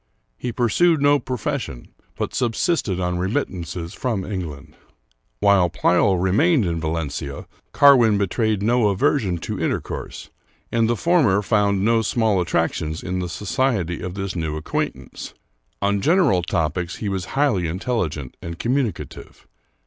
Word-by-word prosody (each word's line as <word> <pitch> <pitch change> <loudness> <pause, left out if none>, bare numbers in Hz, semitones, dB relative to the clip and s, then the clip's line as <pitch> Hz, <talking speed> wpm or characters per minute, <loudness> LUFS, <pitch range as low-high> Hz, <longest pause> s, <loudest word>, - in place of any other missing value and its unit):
He 125 - -4
pursued 145 +9 +2
no 145 0 +4
profession, 130 - -4 0.3
but - - -3
subsisted 120 - 0
on 90 -1 -1
remittances 90 - -3
from 115 -7 -2
England. 85 -8 -6 0.7
While 100 -3 +4
Pleyel 90 +3 +2
remained 110 - +3
in 85 -1 -1
Valencia, 75 -3 -4 0.3
Carwin 125 -7 +6
betrayed 105 +1 0
no 120 0 +3
aversion 100 -1 +1
to 80 - -5
intercourse, - - -4 0.4
and 115 -1 +2
the 120 - +2
former 130 - +3
found 100 -2 +2
no 115 0 +3
small 110 -3 +1
at 85 - -3
tractions 80 0 -1
in 90 0 -2
the 90 -1 -3
society 105 - -1
of 90 0 -5
this 95 -2 -4
new 80 -3 -2
acquaintance. 75 - -4 0.5
On 100 0 +1
gen 165 - +3
eral 95 - +3
topics 85 +1 -1
he 105 - -5
was 95 -2 -2
highly 115 - +2
intelligent 85 - -3
and 85 0 -6
communicative. 115 - -3
100 Hz, 140 wpm, -22 LUFS, 90-120 Hz, 0.7 s, Carwin